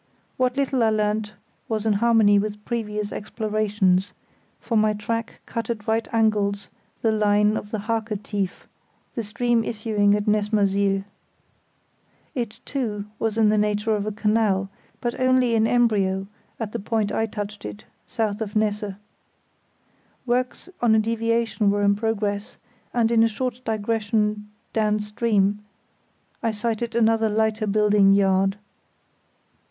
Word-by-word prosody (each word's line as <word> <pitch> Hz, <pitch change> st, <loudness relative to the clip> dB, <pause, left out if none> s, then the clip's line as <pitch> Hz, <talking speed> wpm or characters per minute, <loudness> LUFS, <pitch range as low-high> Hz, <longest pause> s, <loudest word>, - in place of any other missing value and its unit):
What 255 Hz, +1 st, 0 dB
little 270 Hz, -2 st, +1 dB
I 225 Hz, -, +4 dB
learnt 215 Hz, 0 st, -1 dB, 0.3 s
was 220 Hz, -1 st, -1 dB
in 220 Hz, -, +3 dB
harmony 215 Hz, -1 st, +4 dB
with 210 Hz, 0 st, -4 dB
previous 210 Hz, -3 st, -3 dB
explorations, 210 Hz, -3 st, 0 dB, 0.5 s
for 230 Hz, -, -3 dB
my 215 Hz, 0 st, +3 dB
track 230 Hz, +2 st, -4 dB
cut 230 Hz, -1 st, -4 dB
at 215 Hz, -3 st, -3 dB
right 225 Hz, +1 st, +1 dB
angles 210 Hz, -3 st, +1 dB, 0.3 s
the 225 Hz, -, +3 dB
line 210 Hz, 0 st, +3 dB
of 205 Hz, -, -4 dB
the 220 Hz, -, -2 dB
Harke 220 Hz, 0 st, -2 dB
Tief, 200 Hz, -4 st, -3 dB, 0.5 s
the 235 Hz, -, -2 dB
stream 230 Hz, +2 st, 0 dB
issuing 210 Hz, -2 st, +1 dB
at 210 Hz, 0 st, -2 dB
Nessmersiel. 200 Hz, -2 st, +2 dB, 1.3 s
It, 235 Hz, -6 st, -4 dB
too, 215 Hz, -7 st, -3 dB
was 225 Hz, -1 st, -1 dB
in 220 Hz, -2 st, +4 dB
the 215 Hz, 0 st, +3 dB
nature 210 Hz, +1 st, +1 dB
of 205 Hz, 0 st, -2 dB
a -, -, -1 dB
canal, 210 Hz, -2 st, +1 dB, 0.3 s
but 240 Hz, -1 st, -2 dB
only 255 Hz, -2 st, +3 dB
in 225 Hz, 0 st, +3 dB
embryo 200 Hz, -6 st, +2 dB, 0.3 s
at 220 Hz, -3 st, -3 dB
the -, -, -3 dB
point 215 Hz, 0 st, -1 dB
I 225 Hz, -, 0 dB
touched 210 Hz, -1 st, -6 dB
it, 105 Hz, 0 st, -8 dB, 0.2 s
south 215 Hz, -1 st, -2 dB
of 210 Hz, -1 st, -4 dB
Nesse. 210 Hz, -2 st, 0 dB, 1.3 s
Works 250 Hz, +5 st, -1 dB
on 230 Hz, -2 st, +4 dB
a -, -, +5 dB
deviation 230 Hz, -1 st, +1 dB
were 205 Hz, 0 st, +1 dB
in 200 Hz, 0 st, +4 dB
progress, 205 Hz, -1 st, -2 dB, 0.3 s
and 235 Hz, -1 st, +2 dB
in 230 Hz, -1 st, +4 dB
a 225 Hz, -, +6 dB
short 245 Hz, +2 st, -3 dB
digression 215 Hz, -1 st, -1 dB, 0.2 s
down 215 Hz, -1 st, +1 dB
stream 210 Hz, -1 st, 0 dB, 0.8 s
I 230 Hz, -, +1 dB
sighted 225 Hz, +1 st, -2 dB
another 225 Hz, -1 st, +3 dB
lighter 215 Hz, 0 st, 0 dB
building 205 Hz, -1 st, +4 dB
yard. 195 Hz, 0 st, +3 dB
215 Hz, 140 wpm, -24 LUFS, 205-225 Hz, 1.3 s, a